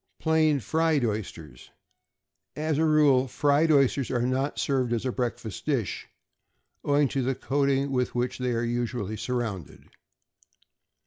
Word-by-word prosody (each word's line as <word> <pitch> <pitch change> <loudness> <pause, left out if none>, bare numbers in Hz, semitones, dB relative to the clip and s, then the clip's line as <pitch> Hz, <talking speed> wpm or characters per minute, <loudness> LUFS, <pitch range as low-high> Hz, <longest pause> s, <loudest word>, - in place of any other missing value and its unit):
=Plain 155 -3 +2
Fried 160 -1 +1
Oysters.= 85 - -6 0.9
As 155 -1 -1
a 160 - +3
rule, 145 -4 +4
fried 145 +4 +2
oysters 140 -3 +2
are 120 -2 0
not 130 +3 -1
served 130 -4 0
as 120 +1 -2
a 130 - 0
breakfast 120 -4 -4
dish, 125 - -2 0.8
owing 145 0 +2
to 135 - -1
the 130 +1 -1
coating 140 +1 0
with 125 -2 -1
which 125 +1 -2
they 125 -1 -1
are 115 0 -1
usually 120 -3 -3
surrounded. 110 - -5
130 Hz, 135 wpm, -26 LUFS, 120-145 Hz, 0.9 s, rule